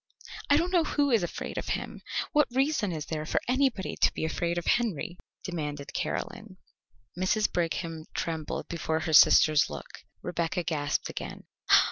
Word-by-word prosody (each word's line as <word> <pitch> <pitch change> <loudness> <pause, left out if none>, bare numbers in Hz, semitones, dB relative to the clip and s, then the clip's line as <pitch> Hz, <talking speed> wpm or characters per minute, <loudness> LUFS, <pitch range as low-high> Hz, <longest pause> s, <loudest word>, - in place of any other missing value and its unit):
"I 285 - +6
don't 345 +3 0
know 350 -3 +4
who 290 -2 +1
is 230 -4 +4
afraid 175 - -4
of - - -6
him! - - -8 0.3
What 300 -1 +4
reason 265 -5 +1
is 155 -2 -4
there 155 -1 -3
for 155 - 0
anybody 255 -6 +1
to - - +4
be - - -1
afraid 170 +2 -1
of 175 - -2
Henry?" 210 -8 0 0.3
demanded 150 -5 -4
Caroline. - - -4 0.6
Mrs. 190 +4 +1
Brigham 165 -1 -2
trembled 160 -2 -3
before 160 -1 -2
her 160 0 -2
sister's 155 0 +7
look. 75 0 -8 0.2
Rebecca 175 0 -1
gasped 145 -4 -1
again. - - -6
175 Hz, 155 wpm, -28 LUFS, 160-240 Hz, 0.6 s, sister's